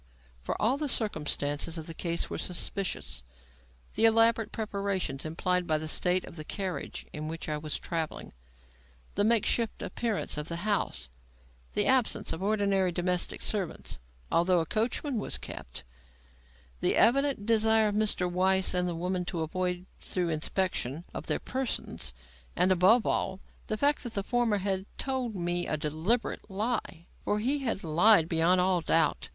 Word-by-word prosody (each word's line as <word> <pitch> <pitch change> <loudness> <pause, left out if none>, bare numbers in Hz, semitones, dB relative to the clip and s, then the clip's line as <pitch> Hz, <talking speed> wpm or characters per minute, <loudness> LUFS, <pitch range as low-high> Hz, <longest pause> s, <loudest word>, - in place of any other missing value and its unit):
For 60 - -3
all 240 +6 +2
the 295 -1 -2
circumstances 155 - -1
of 160 - -5
the 165 - -6
case 170 +1 -2
were - - -5
suspicious. 180 - -3 0.7
The 225 - +4
elaborate 225 0 +4
preparations 200 -10 -2
implied 180 +3 0
by 155 - +2
the 155 +1 -4
state 180 +3 +2
of - - -11
the 155 - -5
carriage 190 +3 -4
in 155 0 -5
which 160 +1 -5
I 150 -1 -2
was 150 0 -3
travelling; 165 -2 -4 0.8
the 205 - +2
make 225 0 +4
shift 230 -2 0
appearance 220 -9 -1
of 150 - -4
the 170 +3 -3
house; 200 - 0 0.6
the - - +2
absence 260 -3 +2
of 160 - -6
ordinary 200 -2 +2
domestic 180 0 -1
servants, 200 -5 -3 0.3
although 175 +1 +4
a 165 - 0
coachman 230 - -1
was - - -1
kept; - - -7 1.0
the - - +2
evident 275 -3 +3
desire 220 -1 +4
of - - -3
Mr. 210 -4 +1
Weiss 190 +1 +2
and 180 0 +1
the 170 - -3
woman 180 +2 -1
to 170 -2 -3
avoid 180 +2 -2
thorough 180 -2 -2
inspection 160 -2 -1
of - - -6
their - - +1
persons; 260 - -2 0.4
and, 185 - +3
above 190 +6 +5
all, 190 0 0 0.3
the 215 - -1
fact 285 +4 +2
that 240 -4 -5
the 200 - -1
former 240 -2 +1
had 195 0 -2
told 260 -5 -2
me 175 -1 -1
a 155 - 0
deliberate 160 +12 0
lie. 195 -4 -2 0.2
For 205 - +1
he 260 +7 0
had 230 -7 -2
lied, 170 +2 +5
beyond 170 +2 +3
all 180 -1 +3
doubt. 165 -1 +2
185 Hz, 160 wpm, -29 LUFS, 170-220 Hz, 1.0 s, above